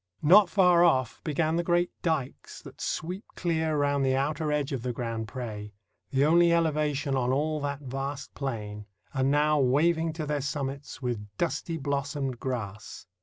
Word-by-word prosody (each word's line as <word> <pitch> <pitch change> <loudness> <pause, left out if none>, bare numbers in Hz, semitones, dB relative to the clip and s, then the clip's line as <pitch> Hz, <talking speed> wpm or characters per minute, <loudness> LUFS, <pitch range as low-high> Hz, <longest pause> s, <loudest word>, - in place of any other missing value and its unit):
Not 185 +5 +7
far 180 -3 +5
off 130 -9 +2
began 160 +1 0
the 170 - +1
great 175 0 +1
dikes 155 -6 -3
that - - -12
sweep 180 +6 -3
clear 160 -3 0
round 145 -1 +1
the 130 0 +2
outer 150 +3 -1
edge 150 0 0
of 135 -4 -2
the 125 +1 -2
Grand 115 -2 -4
Pre, 105 -4 -6 0.3
the 135 +1 +2
only 170 +2 +5
elevation 150 -4 +1
on 125 -1 +1
all 155 +3 0
that 140 0 -3
vast 135 +1 -5
plain, 105 -6 -5 0.3
and 135 -1 +1
now 150 +1 +3
waving 160 +5 +2
to 155 -1 -4
their 145 -1 -1
summits 140 0 -4
with 115 -4 -3
"dusty 165 0 -2
blossomed 140 -2 -2
grass." 105 -7 -5
145 Hz, 165 wpm, -28 LUFS, 130-160 Hz, 0.3 s, Not